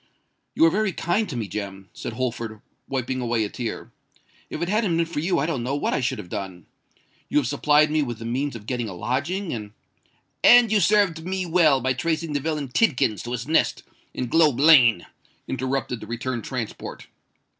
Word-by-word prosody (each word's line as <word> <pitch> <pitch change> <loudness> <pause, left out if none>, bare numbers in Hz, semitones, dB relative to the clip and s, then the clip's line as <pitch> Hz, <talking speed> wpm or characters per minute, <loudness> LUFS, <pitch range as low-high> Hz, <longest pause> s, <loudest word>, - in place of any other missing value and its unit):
"You - - +5
are 165 - +5
very 210 0 0
kind 190 +8 0
to - - -5
me, 110 -3 -3
Jem," 95 -1 -6
said - - -6
Holford, 115 -3 -4 0.3
wiping 130 -1 -2
away 120 -2 0
a 105 - -3
tear. 115 0 -5 0.6
"If - - -5
it 170 - -2
hadn't 205 -4 +1
been 170 - +2
for 165 -2 -4
you 175 +3 0
I 140 - +1
don't 155 -7 -2
know 130 +4 -2
what 145 - -1
I - - +1
should 125 - -1
have 105 -4 -8
done. 90 -2 -6 0.6
You - - +1
have 145 - +3
supplied 150 +4 +3
me 155 0 +2
with 120 -5 -3
the 115 - -8
means 130 +3 -2
of 105 -3 -9
getting 120 -2 -3
a 95 - -7
lodging 150 - -2
and——" 105 -3 -6 0.7
"And 240 -2 +7
you 215 - +4
served 185 -3 +2
me 185 +1 -2
well 160 -6 +4
by 130 +1 +1
tracing 160 +3 -2
the 145 - +1
villain 150 -2 -3
Tidkins 125 - +1
to 120 - -5
his 125 +1 -4
nest 160 - +1 0.3
in 130 - -3
Globe 150 -1 +3
Lane," 130 - +6 0.4
interrupted 130 -1 -2
the 105 - -10
returned 120 0 -4
transport. 125 -5 -6
135 Hz, 200 wpm, -24 LUFS, 115-165 Hz, 0.7 s, And